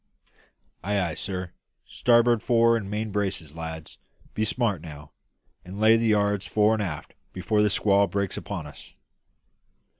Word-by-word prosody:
"Ay, 100 +2 0
ay, 85 -4 -1
sir! 90 0 -5 0.3
Starboard 120 -1 +3
fore 115 0 +3
and 105 -4 -3
main 105 +1 -3
braces, 95 -7 -3
lads. 80 -1 -8 0.3
Be 110 - -1
smart, 110 -5 0
now, 75 -2 -11 0.5
and 95 +3 -9
lay 110 +1 +6
the 115 0 +1
yards 100 -2 +1
fore 105 +1 +3
and 110 - -1
aft 80 -7 -5 0.2
before 105 +3 0
the 105 - +3
squall 100 0 +3
breaks 100 -2 -2
upon 90 -6 -6
us!" 75 -3 -13
100 Hz, 150 wpm, -25 LUFS, 90-110 Hz, 0.5 s, lay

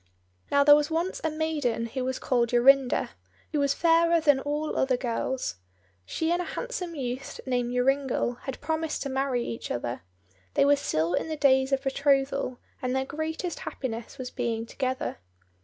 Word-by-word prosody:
Now, 280 0 +4
there 290 0 +9
was 295 0 +1
once 335 +4 -1
a 320 - +1
maiden 305 -7 -1
who 255 +3 -4
was 260 0 -2
called 240 -2 +1
Jorinda, 255 +2 +4 0.4
who 300 - 0
was 280 -1 +2
fairer 335 0 +4
than 290 -4 +4
all 295 +2 -2
other 260 -2 +2
girls. 245 - -2 0.5
She 320 +1 -1
and 350 +1 +1
a - - -3
handsome 360 -9 -4
youth 255 -2 -4
named 245 -2 0
Joringel 250 -1 +1
had 270 - -5
promised 315 +1 -2
to 280 - -3
marry 265 -2 0
each 230 - -5
other. 120 0 -3 0.5
They - - +5
were 285 0 +6
still 170 - -1
in - - 0
the 315 - -3
days 265 -1 +4
of 270 0 +1
betrothal, 275 -1 +1 0.2
and 255 0 -1
their 265 0 0
greatest 315 +4 -4
happiness 235 -1 -5
was 255 -2 -6
being 230 -3 -2
together. 260 +2 -3
270 Hz, 175 wpm, -27 LUFS, 250-300 Hz, 0.5 s, there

